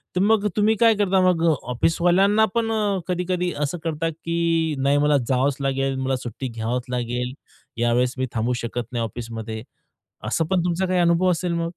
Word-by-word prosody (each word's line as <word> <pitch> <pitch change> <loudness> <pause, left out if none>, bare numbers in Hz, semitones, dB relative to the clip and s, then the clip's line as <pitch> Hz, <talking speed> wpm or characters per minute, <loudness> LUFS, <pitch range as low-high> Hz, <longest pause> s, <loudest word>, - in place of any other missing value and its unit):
तर 180 - +2
मग 210 0 +3
तुम्ही 215 +1 +3
काय 230 -1 +6
करता 195 -2 +2
मग? 165 -2 +1 0.2
ऑफिसवाल्यांना 175 - +3
पण 225 -1 +1
अ, 205 -3 0
कधी-कधी 180 0 -1
असं 160 +5 -2
करता, 165 0 -1
की 165 -1 -1
नाही 140 +2 +2
मला 145 0 +3
जावच 135 +1 +1
लागेल 135 0 0
मला 130 0 0
सुट्टी 125 +1 -5
घ्यावंच 120 +1 -3
लागेल. 125 +1 -2 0.4
यावेळेस 120 +2 +1
मी 130 - 0
थांबू 115 +2 0
शकत 120 0 -4
नाही 120 -2 -1
ऑफिसमध्ये, 110 -1 -6 0.6
असं 165 - 0
पण 185 +1 +1
तुमचा 180 +2 0
काही 180 0 +1
अनुभव 175 +1 +3
असेल 175 0 -1
मग? 170 0 -1
160 Hz, 175 wpm, -23 LUFS, 125-180 Hz, 0.6 s, काय